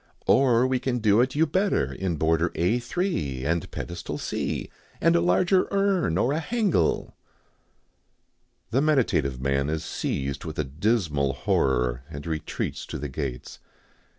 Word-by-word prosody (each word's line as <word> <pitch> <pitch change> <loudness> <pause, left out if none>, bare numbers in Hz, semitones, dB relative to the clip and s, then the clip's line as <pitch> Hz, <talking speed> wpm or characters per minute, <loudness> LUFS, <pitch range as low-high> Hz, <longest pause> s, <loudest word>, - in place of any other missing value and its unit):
Or 125 -2 +4
we 130 0 +1
can 125 -1 -1
do 110 -1 +4
it 130 +2 0
you 160 +2 +4
better 190 +6 0
in 95 -3 -2
border 80 +2 +1
A 90 +9 +2
3, 120 - -2
and 85 +2 -1
pedestal 85 0 -5
C, - - -3 0.3
and 165 +1 +4
a 170 - +4
larger 185 +2 +3
urn 195 - +1
or 125 +8 +2
a 155 - 0
hangel 185 - 0 0.8
" - - -45
The 130 +4 +2
meditative 115 - +1
man 70 +2 0
is 80 0 -2
seized 70 -1 -3
with - - -6
a - - +1
dismal 75 - 0
horror, 60 -2 +1
and 70 -2 -8
retreats 80 -2 -4
to - - -5
the 75 +1 -5
gates. 65 -2 -5
90 Hz, 150 wpm, -26 LUFS, -, 0.8 s, Or